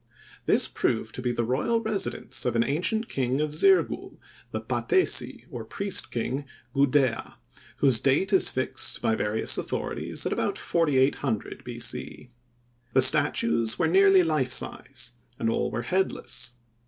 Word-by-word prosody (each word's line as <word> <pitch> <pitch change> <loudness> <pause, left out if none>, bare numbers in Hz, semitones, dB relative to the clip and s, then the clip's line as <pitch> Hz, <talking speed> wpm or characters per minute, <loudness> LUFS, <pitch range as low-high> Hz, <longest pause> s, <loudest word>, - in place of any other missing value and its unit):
This - - +4
proved 110 -1 -2
to - - -6
be 125 -1 -1
the 120 - -2
royal 135 - 0
residence 220 -3 -2
of 125 -2 -2
an 115 - +3
ancient 180 - 0
king 130 0 -2
of 150 0 -2
Zirgul, 375 - +1 0.3
the - - -4
patesi, 375 -1 +1
or - - -6
priest 195 -11 -2
king 130 +4 -4 0.3
Gudea, 140 -3 0 0.4
whose 130 -5 +4
date 145 - +1
is 190 - +5
fixed 130 - 0
by 110 - +2
various 110 0 +1
authorities - - -4
at - - -1
about - - -2
4800 135 -7 -1
B. 120 -1 -8
C. 125 +1 -3 0.6
The 130 - +4
statues 135 - +4
were 165 - +1
nearly 190 +2 +5
life 155 -6 -1
size, 125 -1 -4 0.3
and 115 0 -1
all - - -1
were 120 - -4
headless. 125 -6 -2
135 Hz, 145 wpm, -26 LUFS, 120-170 Hz, 0.6 s, is